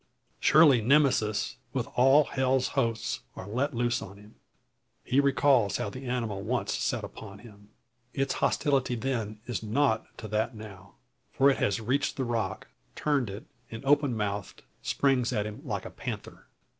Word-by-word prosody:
Surely 150 -6 +6
Nemesis, 130 -2 +2 0.2
with 125 -3 -1
all 135 +4 +6
hell's 130 -1 0
hosts, 115 -4 -1 0.2
are 95 - -8
let 130 +6 -1
loose 120 0 0
on 100 +1 -9
him! 105 +1 -16 0.7
He 130 - +2
recalls 135 -7 +3
how 120 -4 -3
the 130 +2 -8
animal 115 -5 -2
once - - -1
set - - -1
upon 100 -3 -9
him. 105 -2 -16 0.4
Its 135 0 -1
hostility 135 -4 +1
then 110 -4 -3
is 120 -6 -3
nought 110 +1 +1
to 110 - -7
that 110 +2 -1
now. 100 -3 -11 0.4
For 140 +1 +4
it - - -1
has 100 0 0
reached 130 +5 -1
the 130 - -1
rock, 115 -5 -2 0.3
turned 140 -7 0
it, 100 +3 -8 0.2
and 115 +3 -8
open 140 -4 +3
mouthed, 105 -1 -4 0.2
springs 135 -4 +1
at 105 - -1
him 105 0 -7
like - - -4
a - - -7
panther. - - -7
120 Hz, 160 wpm, -28 LUFS, 105-135 Hz, 0.7 s, Surely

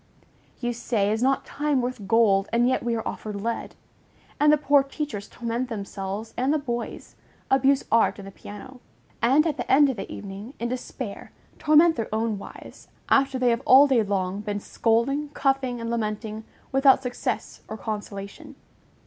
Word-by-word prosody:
You 240 -1 -2
say, 220 -3 0
Is 220 +1 -1
not 270 +1 +1
time 295 -2 0
worth 245 -5 -4
gold, 200 -2 +3
and 235 +1 +3
yet 255 - +1
we 235 -1 -1
are 225 - -3
offered 215 -1 -5
lead? 230 +3 -4 0.6
And 295 0 +5
the 300 - +5
poor 285 -1 +4
teachers 275 -7 -5
torment 240 +2 -3
themselves 200 0 -5
and 260 +3 +1
the 310 - +3
boys, 240 -5 -5 0.4
abuse 270 +1 +4
art 230 0 +3
and 195 -1 -9
the - - -9
piano; 210 +7 -11 0.4
and 275 +6 +4
at 305 -3 -1
the 245 - -3
end 280 0 +6
of 250 - -8
the 195 - -6
evening, 200 +6 -8
in 235 - -2
despair, 250 -3 -6 0.3
torment 315 +2 +5
their 225 - -3
own 220 -1 -1
wives, - - -12 0.2
after 270 -1 +3
they 250 -1 +2
have 235 +1 0
all 265 +3 +8
day 265 -5 +3
long 195 -2 -1
been 205 -1 -3
scolding, 245 +8 0
cuffing, 270 -3 0
and 230 0 -4
lamenting, 215 -1 -3 0.3
without 270 0 +5
success 250 -1 -4
or 220 - -6
consolation. 205 -2 -7
235 Hz, 175 wpm, -25 LUFS, 215-270 Hz, 0.6 s, all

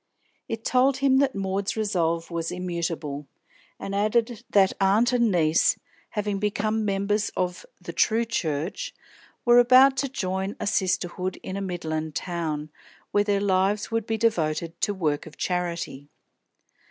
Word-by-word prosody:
It 225 0 -5
told 260 +1 +3
him 270 -1 +3
that 275 -3 +2
Maud's 195 +1 -2
resolve 170 -6 0
was 165 -1 -2
immutable, 170 -5 -3 0.5
and 195 - -5
added 220 +3 0
that 195 -2 +4
aunt 215 +6 +3
and 235 -2 +3
niece, 160 -3 +3 0.3
having 205 -2 -2
become 215 +1 0
members 205 +1 0
of 180 - -2
"the - - -8
true 230 +1 +2
Church," 175 - -3 0.5
were 240 0 +7
about 255 +3 +7
to 275 +1 0
join 190 -5 -2
a - - -3
sisterhood 185 -1 -1
in 190 - -5
a 200 - -3
midland 160 -4 -3
town, 155 -4 -3 0.4
where 205 - +3
their 200 -1 +1
lives 200 +2 +1
would 225 -1 -1
be 225 - 0
devoted 165 -7 0
to - - +2
work 155 -4 -1
of 155 - -13
charity. 170 -6 -3
195 Hz, 145 wpm, -25 LUFS, 170-220 Hz, 0.5 s, were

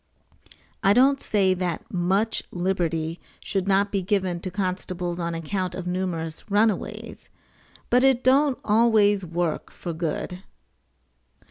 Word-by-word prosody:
[I 195 - +5
don't 270 +4 +4
say 195 -3 +2
that 180 -1 -4
much 190 +5 +1
liberty 170 -3 -1 0.2
should 195 -2 -2
not 200 +1 +2
be 195 - 0
given 185 -2 0
to 185 - -5
constables 180 -2 -3
on 170 -1 -2
account 180 +2 -3
of 185 - -5
numerous 180 -2 -3
runaways, 210 0 -1 0.6
but 250 +2 +5
it 265 -2 +4
don't 270 0 +4
always 210 -2 +4
work 170 -2 -2
for 170 - -6
good. 165 +2 -3
185 Hz, 125 wpm, -25 LUFS, 175-205 Hz, 0.6 s, I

